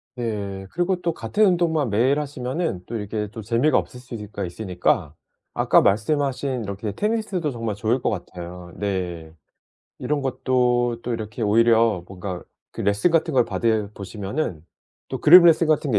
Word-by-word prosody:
네. 100 Hz, -5 st, -4 dB
그리고 180 Hz, +1 st, 0 dB
또 170 Hz, -, 0 dB
같은 215 Hz, +5 st, 0 dB
운동만 165 Hz, -, +2 dB
매일 130 Hz, +8 st, +2 dB
하시면은 140 Hz, -, -3 dB
또 115 Hz, -, -6 dB
이렇게 105 Hz, 0 st, -3 dB
또 110 Hz, -, -7 dB
재미가 120 Hz, +8 st, +2 dB
없을 125 Hz, -, -8 dB
수가 105 Hz, -5 st, -6 dB
있으니까 90 Hz, 0 st, -1 dB, 0.4 s
아까 -, -, +4 dB
말씀하신 130 Hz, +3 st, 0 dB
이렇게 100 Hz, +1 st, -4 dB
테니스도 210 Hz, -, -1 dB
정말 115 Hz, -4 st, -3 dB
좋을 110 Hz, +5 st, 0 dB
것 -, -, 0 dB
같아요. 90 Hz, -2 st, -7 dB
네. 90 Hz, -5 st, -3 dB, 0.7 s
이런 145 Hz, +3 st, -1 dB
것도 125 Hz, -2 st, +1 dB
또 120 Hz, -, -3 dB
이렇게 110 Hz, +1 st, -6 dB
오히려 115 Hz, -2 st, +3 dB
뭔가 95 Hz, -1 st, -6 dB, 0.3 s
그 -, -, -6 dB
레슨 100 Hz, -, +2 dB
같은 165 Hz, 0 st, +1 dB
걸 125 Hz, -3 st, +3 dB
받아 110 Hz, -3 st, 0 dB
보시면은 100 Hz, -, -4 dB, 0.5 s
또 -, -, -5 dB
그룹 175 Hz, +3 st, +9 dB
레슨 165 Hz, 0 st, +5 dB
같은 150 Hz, -2 st, +2 dB
게 105 Hz, -, +3 dB
115 Hz, 325 characters per minute, -23 LUFS, 100-145 Hz, 0.7 s, 그룹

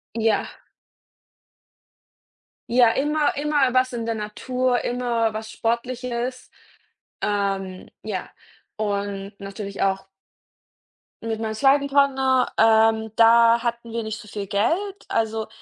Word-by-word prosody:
Ja. 225 Hz, -1 st, +1 dB, 2.2 s
Ja, 240 Hz, -2 st, +5 dB
immer 295 Hz, +3 st, 0 dB
immer 290 Hz, -3 st, +1 dB
was 255 Hz, 0 st, +2 dB
in 230 Hz, -2 st, -4 dB
der 230 Hz, -, -1 dB
Natur, 245 Hz, +4 st, -1 dB
immer 235 Hz, -2 st, 0 dB
was 220 Hz, 0 st, -6 dB
Sportliches. 245 Hz, +1 st, -3 dB, 0.7 s
Ähm, 195 Hz, -2 st, -2 dB, 0.2 s
ja, 205 Hz, -4 st, -4 dB, 0.5 s
und 200 Hz, -1 st, -3 dB
natürlich 200 Hz, 0 st, -6 dB
auch 195 Hz, 0 st, 0 dB, 1.2 s
Mit 225 Hz, -1 st, -3 dB
meinem 220 Hz, -1 st, -3 dB
zweiten 275 Hz, +4 st, +3 dB
Partner, 265 Hz, -2 st, +2 dB
ähm, 220 Hz, 0 st, +4 dB
da 230 Hz, +1 st, +6 dB
hatten 235 Hz, -1 st, -3 dB
wir 230 Hz, 0 st, -2 dB
nicht 220 Hz, 0 st, -5 dB
so 210 Hz, -, -12 dB
viel 205 Hz, -1 st, -6 dB
Geld. 330 Hz, -, -1 dB
Also, 220 Hz, -1 st, -1 dB
230 Hz, 110 wpm, -23 LUFS, 215-255 Hz, 2.2 s, da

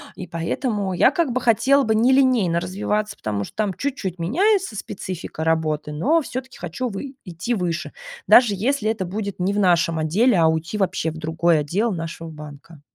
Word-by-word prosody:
и 185 Hz, -, -7 dB
поэтому 195 Hz, -, -2 dB
я 195 Hz, -, +4 dB
как 310 Hz, -6 st, 0 dB
бы 255 Hz, -, -1 dB
хотела 265 Hz, +4 st, +3 dB
бы 220 Hz, -2 st, +1 dB
не 235 Hz, +4 st, +4 dB
линейно 235 Hz, -11 st, +3 dB
развиваться, 210 Hz, +2 st, -2 dB
потому 105 Hz, -2 st, -3 dB
что -, -, -10 dB
там 210 Hz, -3 st, 0 dB
чуть-чуть 205 Hz, -8 st, -4 dB
меняется 355 Hz, -, +1 dB
специфика 185 Hz, -5 st, -6 dB
работы, 155 Hz, -2 st, 0 dB
но 275 Hz, -, +2 dB
всё-таки 260 Hz, -2 st, -7 dB
хочу 180 Hz, +9 st, -4 dB
вы 260 Hz, +6 st, -6 dB
идти 180 Hz, +6 st, -3 dB
выше, 180 Hz, -6 st, -2 dB, 0.4 s
даже 240 Hz, -4 st, +7 dB
если 225 Hz, +2 st, 0 dB
это 220 Hz, -3 st, -1 dB
будет 200 Hz, +2 st, -5 dB
не 180 Hz, +2 st, +1 dB
в 205 Hz, -, 0 dB
нашем 170 Hz, -4 st, +2 dB
отделе, 195 Hz, +8 st, +2 dB
а 165 Hz, -, +5 dB
уйти 160 Hz, +5 st, -1 dB
вообще 180 Hz, -5 st, 0 dB
в 160 Hz, -, -9 dB
другой 160 Hz, +1 st, +1 dB
отдел 190 Hz, +11 st, 0 dB
нашего 165 Hz, -2 st, -5 dB
банка. 150 Hz, 0 st, -12 dB
190 Hz, 180 wpm, -22 LUFS, 165-235 Hz, 0.4 s, даже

